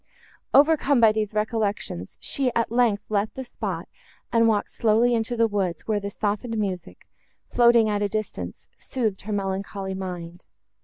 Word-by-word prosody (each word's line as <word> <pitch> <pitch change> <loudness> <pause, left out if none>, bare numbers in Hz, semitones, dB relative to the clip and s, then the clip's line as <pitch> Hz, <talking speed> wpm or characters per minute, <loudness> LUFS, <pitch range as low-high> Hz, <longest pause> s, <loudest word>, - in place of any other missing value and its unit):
Overcome 285 -2 +5
by 225 -2 +7
these 215 -1 -1
recollections, 210 - -2
she, 265 -3 0
at 230 -1 +1
length, 230 -4 +2
left 205 0 0
the 265 - -4
spot, 245 - -5 0.5
and 230 -1 +5
walked 210 -2 +1
slowly 230 +2 +3
into 235 +1 -1
the 230 0 +4
woods, 195 -5 -2
where 215 -2 +1
the 200 0 -4
softened 215 +3 -2
music, 190 -4 -4 0.4
floating 235 -2 +5
at 205 -1 0
a 205 - +2
distance, 215 +1 -5
soothed 220 -7 -2
her 215 - -6
melancholy 195 0 -3
mind. 180 -2 -7
215 Hz, 155 wpm, -25 LUFS, 200-230 Hz, 0.5 s, by